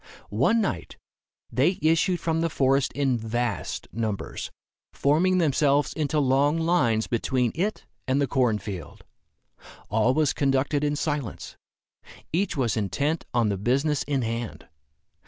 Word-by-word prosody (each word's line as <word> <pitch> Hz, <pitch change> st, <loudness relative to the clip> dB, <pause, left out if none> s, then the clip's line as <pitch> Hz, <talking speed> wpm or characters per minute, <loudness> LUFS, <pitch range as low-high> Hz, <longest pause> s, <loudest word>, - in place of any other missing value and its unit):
One 135 Hz, -, +3 dB
night, 90 Hz, -, -3 dB, 0.5 s
they 155 Hz, +9 st, +2 dB
issued 165 Hz, +3 st, +2 dB
from 165 Hz, -1 st, 0 dB
the 165 Hz, -, +1 dB
forest 135 Hz, -2 st, +2 dB
in 135 Hz, -4 st, +1 dB
vast 115 Hz, -4 st, -3 dB
numbers, 110 Hz, -3 st, -3 dB, 0.4 s
forming 170 Hz, +6 st, +2 dB
themselves 145 Hz, -3 st, +2 dB
into 155 Hz, 0 st, -1 dB
long 140 Hz, +3 st, +3 dB
lines 155 Hz, -10 st, +2 dB
between 125 Hz, 0 st, 0 dB
it 200 Hz, +6 st, -2 dB, 0.2 s
and 130 Hz, +2 st, +2 dB
the 140 Hz, -, +3 dB
corn 125 Hz, -4 st, +1 dB
field. 95 Hz, -6 st, -8 dB, 0.9 s
All 110 Hz, +4 st, +2 dB
was 155 Hz, -3 st, +2 dB
conducted 140 Hz, +1 st, +1 dB
in 145 Hz, 0 st, +1 dB
silence. 145 Hz, -5 st, -3 dB, 0.8 s
Each 185 Hz, -1 st, 0 dB
was 120 Hz, -5 st, +1 dB
intent 140 Hz, -, -1 dB
on 120 Hz, -3 st, +2 dB
the 100 Hz, -, -1 dB
business 140 Hz, +7 st, +1 dB
in 140 Hz, -3 st, -1 dB
hand. 115 Hz, 0 st, -4 dB
135 Hz, 135 wpm, -26 LUFS, 115-155 Hz, 0.9 s, One